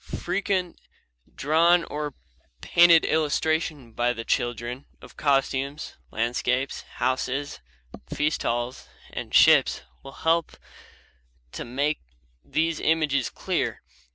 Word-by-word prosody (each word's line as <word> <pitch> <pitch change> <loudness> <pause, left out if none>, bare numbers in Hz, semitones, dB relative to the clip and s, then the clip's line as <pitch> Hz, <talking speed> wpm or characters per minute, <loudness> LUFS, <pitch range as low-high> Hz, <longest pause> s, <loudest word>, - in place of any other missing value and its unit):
Frequent 185 0 -2 0.6
drawn 165 +4 +4
or 150 -3 -5 0.4
painted 170 -1 +6
illustration 155 -3 0
by 120 +2 +1
the 115 -1 -7
children 120 +2 -2
of - - -15
costumes, 140 0 0
landscapes, 125 +4 -1
houses, 130 +2 -2 0.5
feast 150 +1 0
halls, 120 +2 -2 0.3
and - - -6
ships - - +5 0.2
will 135 - -11
help 165 0 +1 0.9
to - - -6
make 140 +5 -1 0.4
these 160 0 -1
images 155 -5 +1
clear. - - -2
145 Hz, 100 wpm, -25 LUFS, 125-160 Hz, 0.9 s, painted